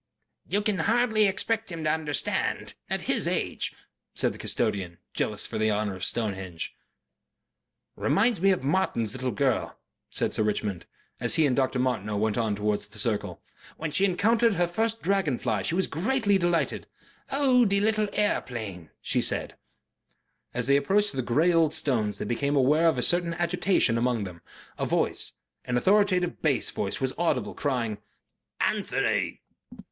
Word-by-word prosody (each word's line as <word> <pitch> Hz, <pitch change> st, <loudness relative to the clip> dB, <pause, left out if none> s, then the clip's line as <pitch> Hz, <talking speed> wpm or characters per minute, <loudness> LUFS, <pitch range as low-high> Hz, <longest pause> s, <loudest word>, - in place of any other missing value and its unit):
"You 205 Hz, +1 st, +1 dB
can 205 Hz, -2 st, 0 dB
hardly 220 Hz, -2 st, +3 dB
expect 215 Hz, +2 st, -1 dB
him 165 Hz, -2 st, -5 dB
to 155 Hz, -, +2 dB
understand 150 Hz, -3 st, -2 dB, 0.2 s
at -, -, -2 dB
his -, -, +1 dB
age," -, -, -1 dB, 0.4 s
said -, -, +1 dB
the -, -, -12 dB
custodian, 100 Hz, -7 st, -1 dB, 0.2 s
jealous -, -, -1 dB
for -, -, -4 dB
the 110 Hz, 0 st, +2 dB
honor 105 Hz, -1 st, 0 dB
of 95 Hz, -, -8 dB
Stonehenge.... 95 Hz, -6 st, -3 dB, 1.2 s
"Reminds 215 Hz, -1 st, +2 dB
me 195 Hz, -, +5 dB
of 185 Hz, -7 st, +1 dB
Martin's 135 Hz, -, 0 dB
little 130 Hz, 0 st, -2 dB
girl," 130 Hz, -2 st, 0 dB, 0.3 s
said -, -, -1 dB
Sir -, -, +1 dB
Richmond, 105 Hz, -4 st, -2 dB, 0.3 s
as -, -, +3 dB
he 160 Hz, -2 st, +4 dB
and 130 Hz, -3 st, +2 dB
Dr. 130 Hz, -1 st, +1 dB
Martineau 115 Hz, -5 st, -1 dB
went 105 Hz, 0 st, +1 dB
on 110 Hz, -3 st, 0 dB
towards 105 Hz, 0 st, -1 dB
the 105 Hz, +1 st, -15 dB
circle. 105 Hz, -5 st, -2 dB, 0.3 s
"When 160 Hz, -1 st, -3 dB
she 190 Hz, -, +2 dB
encountered 220 Hz, +4 st, +3 dB
her 175 Hz, 0 st, +2 dB
first 220 Hz, +6 st, -2 dB
dragon 185 Hz, -8 st, +1 dB
fly 110 Hz, -4 st, -1 dB
she 165 Hz, -, -1 dB
was 190 Hz, -, +2 dB
greatly 205 Hz, -, +1 dB
delighted. 175 Hz, -1 st, 0 dB, 0.4 s
'Oh, 270 Hz, -3 st, +4 dB
dee' 200 Hz, -2 st, +2 dB
lill' 215 Hz, 0 st, +1 dB
a'eplane,' 110 Hz, -, -2 dB
she -, -, +1 dB
said." -, -, 0 dB, 1.0 s
As 125 Hz, 0 st, -2 dB
they 140 Hz, +2 st, +4 dB
approached 200 Hz, +8 st, +2 dB
the 135 Hz, -, -1 dB
grey 155 Hz, +9 st, +2 dB
old 160 Hz, -2 st, +3 dB
stones 110 Hz, -7 st, -1 dB
they -, -, -4 dB
became 140 Hz, +6 st, 0 dB
aware 150 Hz, +5 st, +4 dB
of 160 Hz, -, +3 dB
a -, -, +1 dB
certain 175 Hz, -1 st, +2 dB
agitation 175 Hz, -, +1 dB
among 120 Hz, -3 st, +1 dB
them. 90 Hz, -3 st, -8 dB, 0.4 s
A -, -, 0 dB
voice, -, -, -1 dB, 0.3 s
an 125 Hz, -, 0 dB
authoritative 185 Hz, +2 st, +2 dB
bass 145 Hz, -5 st, +1 dB
voice, 100 Hz, -, -2 dB
was 130 Hz, -1 st, 0 dB
audible, 170 Hz, -1 st, 0 dB
crying, 120 Hz, -7 st, -2 dB, 0.6 s
"Anthony!" -, -, 0 dB
145 Hz, 160 wpm, -27 LUFS, -, 1.2 s, me